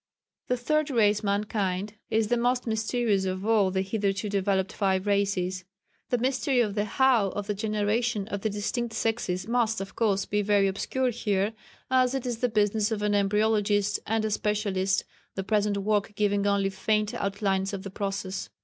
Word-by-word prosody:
The 250 - +1
Third 305 +5 0
Race 210 -5 +3
mankind 200 -1 -1 0.2
is 220 -1 +1
the 240 - +3
most 245 +1 +1
mysterious 220 -2 0
of 185 +1 -3
all 215 -4 +3
the 190 0 0
hitherto 200 0 -1
developed 195 -1 0
five 190 -1 0
Races. 195 -2 0 0.5
The 245 - +2
mystery 260 +1 +1
of 215 -4 +2
the 205 0 0
'How' 235 -2 +3
of 205 - -3
the 210 - -1
generation 210 +1 -1
of 200 -2 -3
the 220 - 0
distinct 225 +3 -3
sexes 215 -5 -1
must, 230 -2 +1
of 195 -1 -7
course, 200 -4 +1
be 210 0 0
very 200 -1 +3
obscure 250 +6 -1
here, 210 -2 0 0.4
as 255 0 +3
it 265 - -3
is 240 -2 -3
the 250 - +1
business 215 0 +1
of 210 -2 -2
an 210 0 +1
embryologist 205 0 +2
and 220 0 0
a 215 - -1
specialist, 200 -2 0 0.3
the 195 - -2
present 205 0 +1
work 205 0 0
giving 205 -1 +1
only 200 -1 +1
faint 210 +2 0
outlines 195 -1 -1
of 195 -2 -5
the 195 - -7
process. 195 -1 -4
210 Hz, 175 wpm, -27 LUFS, 195-225 Hz, 0.5 s, Race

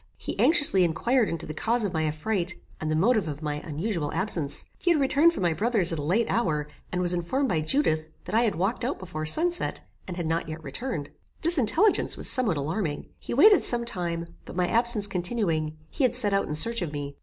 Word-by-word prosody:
He - - -6
anxiously 290 - +5
inquired 215 +8 +1
into 165 - -4
the 155 - -6
cause 230 +7 -1
of 190 - -3
my 160 -1 0
affright, 175 +3 -2 0.2
and 155 - -3
the 155 - 0
motive 210 +2 +2
of 150 0 -6
my 150 -1 -2
unusual 160 +1 -3
absence. 165 -5 -1
He 355 - 0
had 335 -3 +3
returned 285 +4 +4
from 330 - -5
my 170 -2 +2
brother's 205 -3 +2
at 160 - -3
a - - -3
late 190 +11 +1
hour, 150 -10 -1 0.2
and 180 - -1
was 175 0 +3
informed 255 +11 -1
by 160 -5 0
Judith, 155 - 0 0.2
that 180 - -7
I 225 - +4
had 225 -4 0
walked 195 +8 -1
out 260 +4 -2
before 155 -4 -6
sun 335 - +3
set, 345 - -3 0.3
and 180 -1 -6
had 175 - -3
not 165 +1 -2
yet 160 0 -7
returned. 150 - -5 0.3
This 335 -1 +5
intelligence 345 - +2
was - - +1
somewhat 230 - +2
alarming. 155 +2 -3
He - - -5
waited 400 - +6
some 235 -1 +1
time; 170 -6 -3 0.2
but, - - -11
my 180 -1 +1
absence 235 -1 +4
continuing, 175 -5 -2
he 285 - -2
had 250 -2 +2
set 210 -5 +1
out 195 - +1
in 150 - -3
search 230 +7 +2
of 170 -4 -3
me. 145 -1 -6
185 Hz, 225 wpm, -26 LUFS, 155-235 Hz, 0.3 s, waited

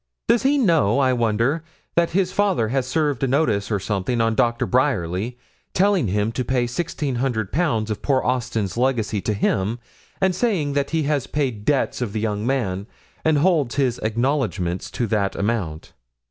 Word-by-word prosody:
Does 235 - +4
he 280 +2 +3
know, 165 - +3
I 130 -2 +3
wonder, 120 +6 +1 0.3
that 170 0 +2
his 185 0 +1
father 190 - +1
has 130 0 0
served 150 -5 0
a 135 - +2
notice 125 -7 +1
or 105 -2 0
something 105 +4 -1
on 115 0 +2
Dr. 120 +2 +1
Bryerly, 120 - 0 0.4
telling 195 - +3
him 105 +3 0
to 125 - -2
pay 125 -1 +1
sixteen 145 0 -3
hundred 120 -5 -1
pounds 120 -9 0
of 105 - -4
poor 135 -2 +1
Austin's 115 -6 -1
legacy 120 -5 0
to 105 - -1
him, 100 +2 0 0.4
and 190 -1 +2
saying 180 -8 0
that 140 0 0
he 160 -1 0
has 145 -2 0
paid 125 -8 -2
debts 140 -3 +1
of 110 -5 -2
the 110 - -1
young 105 0 -2
man, 105 -7 -1 0.4
and 160 -1 +3
holds 150 -6 +2
his 130 -4 +1
acknowledgments 110 -6 -1
to 120 - -2
that 100 -3 0
amount? 100 -7 -2
125 Hz, 175 wpm, -22 LUFS, 110-145 Hz, 0.4 s, Does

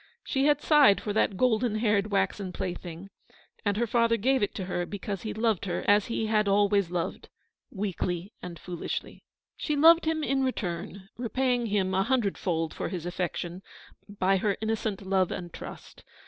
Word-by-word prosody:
She 270 -1 0
had 295 0 +3
sighed 285 - +6
for 205 - -3
that 200 -2 +1
golden 235 -1 +2
haired 210 -2 +1
waxen 195 -1 0
plaything, 180 +1 -6 0.5
and 205 -1 0
her 235 - +2
father 230 0 +2
gave 260 +5 +2
it 205 - -1
to 190 - -3
her 180 -1 -2
because 200 -1 -5
he 215 - -4
loved 220 -3 0
her 175 -3 -2
as 205 0 +4
he 230 -1 -1
had 215 -1 +2
always 200 -2 +3
loved, 175 -1 -3 0.4
weakly 190 -2 -3
and 175 -2 -7
foolishly. 175 +1 -5 0.4
She 300 - -1
loved 325 +3 +7
him 315 -1 0
in 270 -2 +1
return: 195 -5 -3
repaying 245 0 0
him 195 -3 0
a 190 - +3
hun 255 +5 +2
dredfold 170 -5 -1
for - - -4
his 175 -3 -5
affection 175 0 -3 0.5
by 195 -1 +1
her 200 +1 0
innocent 220 -2 -2
love 190 -1 +2
and 175 -2 -6
trust. - - -10
205 Hz, 175 wpm, -28 LUFS, 185-230 Hz, 0.5 s, loved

